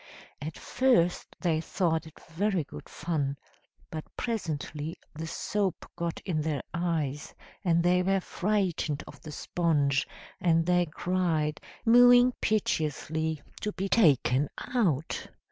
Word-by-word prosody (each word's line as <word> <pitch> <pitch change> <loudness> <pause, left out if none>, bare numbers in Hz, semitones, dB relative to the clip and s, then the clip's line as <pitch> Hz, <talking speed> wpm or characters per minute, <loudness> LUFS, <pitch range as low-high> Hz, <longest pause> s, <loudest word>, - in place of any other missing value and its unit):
At 155 +2 -5
first 240 -10 +1
they 160 -3 +1
thought 165 -2 0
it 160 - -15
very 185 +1 0
good 75 - -11
fun, 145 -5 -2 0.5
but 155 -1 -4
presently 155 - -3 0.2
the 160 +1 -5
soap 195 +2 -1
got 170 -1 -3
in 160 -5 0
their 150 -3 -1
eyes 160 -5 -2 0.3
and 170 -2 +3
they 180 +1 +4
were 195 +1 +2
frightened 185 -7 -1
of - - -13
the 155 - -8
sponge, 145 -4 +1 0.3
and 165 -2 +3
they 180 0 +3
cried, 160 -2 0 0.2
mewing 245 +1 +7
piteously, 160 -6 0 0.2
to 210 - -3
be 195 - -2
taken 145 - +4 0.2
out. 165 - 0
165 Hz, 125 wpm, -29 LUFS, 155-185 Hz, 0.5 s, mewing